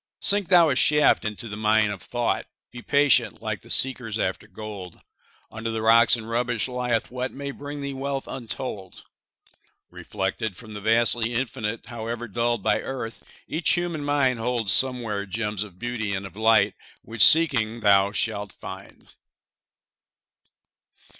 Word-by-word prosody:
Sink 205 -2 +4
thou 175 -4 +5
a - - 0
shaft 150 -3 +4
into 105 +2 -5
the 105 - -7
mine 110 0 +2
of 100 -4 -7
thought; 70 - -2 0.2
Be 120 - -10
patient, 135 -7 +2
like - - -4
the - - -18
seekers 125 -5 +1
after 95 0 -3
gold; 105 -5 -9 0.5
Under 110 +2 -5
the 110 -1 -4
rocks 115 +1 +6
and 110 -2 -8
rubbish 120 0 -1
lieth 125 -3 -2
what 125 +1 -4
May 140 0 -6
bring 145 +1 -8
thee 140 0 -5
wealth 135 0 -4
untold. 115 -6 -7 0.9
Reflected 95 +1 -4
from 110 -3 -12
the 105 - -8
vastly 115 +1 +3
Infinite, 115 -3 -4
However 120 0 -6
dulled 120 0 -2
by - - +1
earth, 125 -4 -7 0.2
each 160 +1 +1
human 175 -3 -2
mind 140 -4 +1
Holds 115 -3 +3
somewhere 115 -6 +3
gems 105 0 -3
of 100 -4 -8
beauty 110 -2 -4
and 95 +1 -5
of 100 - -11
light 110 +1 +3 0.3
Which, 115 -1 -3
seeking, 120 -5 +4
thou 100 -1 +4
shalt 105 -2 -2
find. 95 +1 -11
115 Hz, 150 wpm, -24 LUFS, 105-130 Hz, 0.9 s, rocks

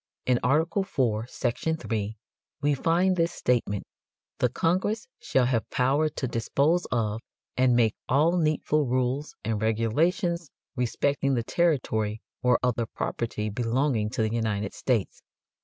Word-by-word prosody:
In 125 -1 +3
Art. 150 +6 +3
IV, 125 - 0
section 130 +6 -1
3, 110 -7 -3 0.4
we 145 0 +2
find 170 +6 +2
this 170 -1 +1
statement: 120 - 0 0.6
"The - - +3
Congress 190 +6 0
shall 130 -2 +2
have 120 -4 0
power 140 +5 +2
to 140 -3 -3
dispose 140 +9 +1
of 110 -2 0 0.3
and 130 -1 +3
make 115 -3 +3 0.2
all 155 +7 +4
needful 155 -3 +1
rules 130 +4 -1
and 110 -1 -1
regulations 160 - +1 0.3
respecting 135 +2 0
the 120 - 0
territory 110 -9 0 0.2
or 125 -1 +4
other 120 -2 +1
property 110 -2 -3
belonging 120 0 0
to 110 - -1
the 110 0 -1
United 105 -3 -1
States." 120 -7 -1
125 Hz, 135 wpm, -27 LUFS, 115-155 Hz, 0.6 s, all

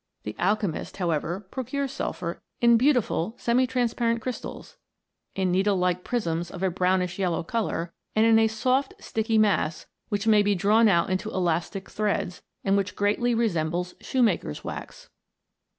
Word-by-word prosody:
The 105 - -5
alchemist, 200 -3 -1
however, 170 0 -1
procures 265 +1 -3
sulphur 170 -1 -4 0.2
in 235 -1 +6
beautiful 235 - +2
semi 250 +2 +2
transpai 240 -2 0
ent 230 0 +1
crys 255 0 -3
tals; - - -9 0.6
in 190 -2 +1
needle 195 +2 +2
like 180 0 0
prisms 175 -8 -2
of 180 - -7
a 190 - +2
brownish 180 +1 0
yellow 175 -3 0
colour; 175 -4 -2 0.2
and 215 +1 +4
in 225 -1 +6
a 225 - +4
soft 255 +5 0
and - - -21
sticky 225 0 0
mass, 200 -7 +2 0.2
which 205 -1 -1
may 215 -2 +5
be 205 0 +2
drawn 215 +5 +4
out 175 -2 +3
into 185 - -1
elastic 180 +1 -1
threads, 205 -4 -2 0.2
and 195 0 +2
which 195 -2 -2
greatly 215 +4 +1
resembles 180 -5 0
shoemaker's 220 - 0
wax. - - -8
205 Hz, 160 wpm, -26 LUFS, 180-230 Hz, 0.6 s, in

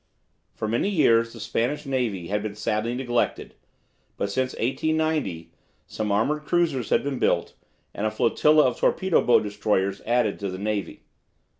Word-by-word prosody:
For 110 - -3
many 120 - 0
years 115 - +3
the - - -11
Spanish 130 +7 -2
Navy 115 -10 -2
had 105 +1 0
been 105 -1 -5
sadly 110 +3 -1
neglected, 120 -2 -1 0.6
but 100 - -2
since 130 +4 -1
1890 150 - -1 0.3
some 105 -1 -3
armoured 145 +9 +1
cruisers 155 -7 0
had - - +2
been 140 -2 -3
built, - - +1 0.4
and 105 - -1
a - - +1
flotilla 150 +8 +3
of 125 - 0
torpedo 190 -2 +2
boat 120 - +4
destroyers 100 -2 -1
added 120 -3 +1
to 100 - -3
the 95 - -5
navy. 105 0 -3
115 Hz, 155 wpm, -25 LUFS, 105-140 Hz, 0.6 s, boat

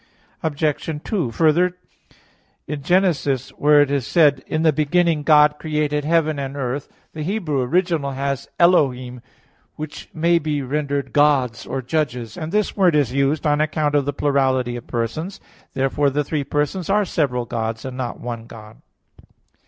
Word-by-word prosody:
Obj. 155 0 -2
2: 180 - -1
Further, 170 +7 +2 0.9
Gen. 155 +6 +1
1:1, 140 -7 -1
where 145 0 +4
it 140 - -4
is 140 -4 -1
said, 150 -5 +3
"In 155 +1 -1
the 160 -2 +4
beginning 160 +2 +2
God 150 0 +5
created 150 -2 -1
heaven 155 -2 +1
and 135 0 -5
earth," 135 +1 -3 0.2
the 155 - -6
Hebrew 160 -5 -1
original 165 +1 0
has 140 0 -3
"Elohim," 130 -8 +2 0.5
which 155 -1 -8
may 170 +1 +2
be 150 -3 -2
rendered 140 +1 -2
"Gods" 135 -6 +2
or 130 0 -3
"Judges": 125 -6 -2
and 155 0 -5
this 210 +1 0
word 185 -5 +3
is 140 -5 +1
used 140 +4 +1
on 150 0 +2
account 155 -1 0
of 145 -2 +2
the 145 - 0
plurality 130 -4 +1
of 120 - -8
persons. 140 - -3 0.4
Therefore 135 +2 +1
the 145 +2 0
three 145 0 -2
persons 150 +6 -2
are 205 +1 +3
"several 125 -9 -1
Gods," 115 0 -4
and 130 -1 -6
not 125 -2 -4
"one" 115 -1 -6
God. 110 -1 -13
145 Hz, 160 wpm, -21 LUFS, 130-155 Hz, 0.9 s, God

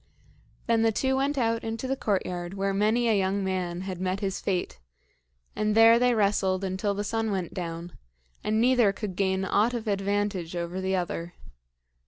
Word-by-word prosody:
Then 230 -1 +2
the 225 0 +3
two 265 +4 0
went 275 +2 0
out 230 -2 +1
into 225 +3 -4
the 270 - 0
courtyard 185 -5 -2
where 195 0 -1
many 215 +4 +2
a 225 - +3
young 195 +1 0
man 180 -2 -2
had 185 -2 -5
met 185 +1 -1
his 195 -2 -3
fate, 180 - -2 0.8
and 215 0 0
there 225 +1 +7
they 250 -1 +3
wrestled 195 -2 +1
until 190 +2 -1
the 205 - -2
sun 225 +1 -1
went 190 -4 -3
down, 170 -1 -6 0.5
and 215 +1 +1
neither 240 -3 +4
could 200 -2 -5
gain 190 0 0
aught 220 +5 +2
of 230 -1 -4
advantage 200 -3 -1
over 175 +2 -3
the 190 0 0
other. 175 -1 -3
200 Hz, 180 wpm, -27 LUFS, 185-225 Hz, 0.8 s, there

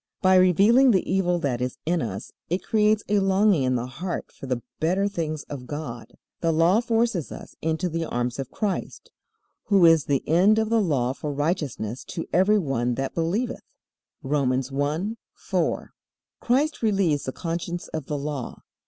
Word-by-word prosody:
By 190 0 +5
revealing 195 +8 +5
the 190 -6 +2
evil 180 -2 +1
that 125 -5 -1
is 125 0 -3
in 170 +1 +1
us 100 -4 -5 0.2
it 180 +3 -1
creates 215 0 +2
a 205 0 +2
longing 195 -3 +3
in 130 -1 +1
the 120 0 -1
heart 165 +8 -5
for 135 - -10
the 125 -2 -2 0.2
better 185 +5 +1
things 160 -6 -3
of 130 -4 -8
God. 145 -6 -6 0.3
The 165 - +1
Law 165 +6 +4
forces 230 - 0
us - - -9
into 160 +3 -1
the 165 -1 -2
arms 120 -2 -2
of 135 -1 -4
Christ, 205 +3 -4 0.5
"who 195 -4 +5
is 165 -3 +5
the 140 -2 -1
end 185 +7 +4
of 220 0 0
the 230 -1 +4
law 130 -9 0
for 150 +2 -5
righteousness 145 - -2
to 165 - -5
every 190 +4 +4
one 125 - 0
that 135 +1 -3
believeth." 205 +10 -1 0.6
(Romans 135 -2 0
1:4.) 155 +11 -2 0.5
Christ 280 +6 +1
relieves 195 -10 +1
the 130 - -2
conscience 170 +2 -4
of 155 -4 -5
the 150 - -2
Law. 140 -3 -5
165 Hz, 170 wpm, -25 LUFS, 135-195 Hz, 0.6 s, By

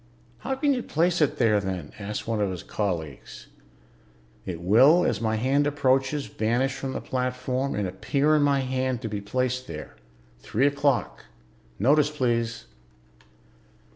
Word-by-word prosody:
"How 265 - -2
can 280 +1 +2
you 250 - -1
place 170 -2 +1
it 150 - +2
there, 110 -4 +3
then?" 95 -6 -4
asked 105 +2 -5
one 110 -2 -1
of 100 - +1
his 90 -2 -6
colleagues. 85 - -4 1.0
"It 85 -3 -4
will, 130 - +5
as - - 0
my 110 -1 0
hand 135 +6 +2
approaches, 135 0 +1
vanish 120 +5 0
from 135 -1 -5
the - - -4
platform 125 +1 -2
and 105 -2 -1
appear 140 +11 +1
in 150 - +3
my 140 -1 +3
hand 130 -1 -2
to - - -2
be 105 -1 -4
placed 125 +4 -2
there. 75 -2 -8 0.4
Three 125 +6 0
o'clock. 145 -2 0 0.5
Notice, 145 +7 +3
please." 115 -5 -1
130 Hz, 150 wpm, -26 LUFS, 105-140 Hz, 1.0 s, will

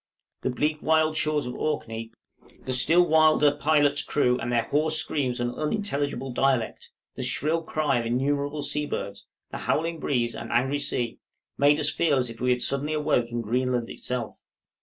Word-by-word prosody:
The - - -1
bleak 150 +4 -1
wild 155 0 +2
shores 155 -2 0
of 125 - -5
Orkney, 115 -6 -3 0.5
the 130 - -2
still 165 +8 +4
wilder 155 -2 +4
pilot's 145 -1 +2
crew, 125 -3 +1
and 120 - -3
their 120 -1 +2
hoarse 155 +2 +1
screams 130 -5 -1
and 120 0 -1
unintelligible 145 - -2
dialect, 130 -3 0 0.2
the - - -7
shrill 160 +3 0
cry 155 -5 0
of 115 - -3
innumerable 140 +4 -1
sea 150 +1 0
birds, 100 -7 -5 0.2
the - - -5
howling 165 +1 -1
breeze 120 -6 0
and 115 - -7
angry 135 +4 +1
sea, 120 -4 -2 0.4
made 145 +2 +4
us 150 0 +2
feel 155 -5 +2
as 125 -2 0
if 115 - -12
we 125 - +1
had 125 -1 +2
suddenly 140 +3 -1
awoke 145 -6 +1
in 120 0 -3
Greenland 125 +1 -1
itself. 125 -3 -4
140 Hz, 175 wpm, -26 LUFS, 125-155 Hz, 0.5 s, still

